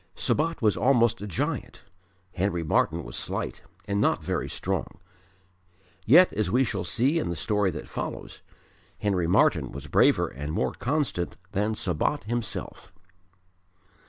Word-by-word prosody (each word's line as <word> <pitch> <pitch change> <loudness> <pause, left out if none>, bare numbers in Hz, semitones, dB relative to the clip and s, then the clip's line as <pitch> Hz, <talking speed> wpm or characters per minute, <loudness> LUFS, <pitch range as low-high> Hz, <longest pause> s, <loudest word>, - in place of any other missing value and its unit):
Sabat 165 -2 0
was 105 -2 +4
almost 120 -4 +3
a 105 - -5
giant; 90 - -3 0.5
Henry 90 -2 -1
Martyn 75 - +1
was - - -8
slight - - -4 0.2
and 100 0 0
not - - +2
very - - -2
strong. - - -3 1.1
Yet 175 - +7
as 105 -4 0
we 125 +6 +3
shall - - -2
see 135 +8 +1
in 150 - -2
the 85 - -2
story 105 +2 +1
that 80 - -6
follows - - -6 0.6
Henry 95 -5 0
Martyn 90 - +3
was 70 +2 -8
braver 75 - +3
and 75 +4 -6
more - - 0
constant 135 - -2
than 105 +3 0
Sabat 100 - -1
himself. 115 +1 -5
105 Hz, 140 wpm, -26 LUFS, 85-125 Hz, 1.1 s, Yet